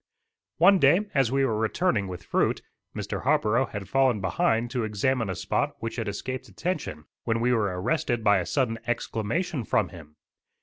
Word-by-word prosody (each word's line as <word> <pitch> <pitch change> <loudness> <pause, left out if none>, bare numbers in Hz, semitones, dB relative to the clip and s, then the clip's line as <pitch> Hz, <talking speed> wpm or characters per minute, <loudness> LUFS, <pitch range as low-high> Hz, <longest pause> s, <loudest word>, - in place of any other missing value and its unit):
One 195 -1 +6
day 150 +7 +5
as 135 -4 +2
we 135 0 +2
were 110 -4 0
returning 110 - +1
with 90 -1 -7
fruit, - - 0 0.3
Mr. - - -4
Harborough 120 +5 +2
had 100 -3 -6
fallen 130 0 +2
behind 110 +6 0
to 125 -2 -1
examine 110 +2 0
a 95 - -2
spot - - -1
which 115 0 -5
had 115 - -2
escaped 130 +6 -4
attention, 145 - -4 0.2
when 115 -1 +1
we 125 +2 +2
were 100 -6 0
arrested 120 - 0
by 105 -2 +5
a 90 - -3
sudden 120 -5 0
exclamation 120 - -2
from 105 -3 +1
him. 75 -4 -13
115 Hz, 175 wpm, -26 LUFS, 105-130 Hz, 0.3 s, One